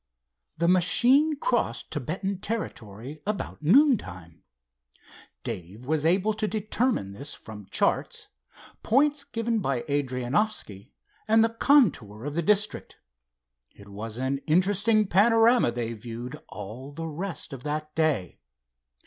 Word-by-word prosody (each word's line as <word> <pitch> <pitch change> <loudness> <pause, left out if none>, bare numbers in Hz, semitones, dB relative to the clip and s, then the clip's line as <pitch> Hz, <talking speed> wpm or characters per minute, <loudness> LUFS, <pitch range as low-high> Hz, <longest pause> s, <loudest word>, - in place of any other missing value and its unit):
The 170 +2 +1
machine 245 - +4
crossed - - -1
Thibetan 180 +7 -3
territory 145 - -6
about 210 -6 -4
noon 255 - +5
time. 85 -3 -11 1.0
Dave 95 +8 -7
was 155 +2 +1
able 195 +5 +2
to 215 0 -2
determine 215 - -1
this 140 +9 -6
from 105 -3 -11
charts, - - 0 0.5
points 285 +4 +2
given 230 -3 -2
by 135 - -1
Adrianoffski, 130 - -1 0.4
and 220 +1 +5
the 225 - +3
contour 185 - +2
of 145 - -4
the 170 - 0
district. 210 +4 0 0.8
It 100 0 -15
was 105 +3 -7
an 130 +2 -1
interesting 205 +6 +3
panorama 225 - +4
they 115 -1 -3
viewed 120 +5 -8
all 110 +8 -8
the 165 +3 -6
rest 165 -1 -5
of 135 - -7
that 150 +2 -4
day. 155 - 0
155 Hz, 125 wpm, -26 LUFS, -, 1.0 s, noon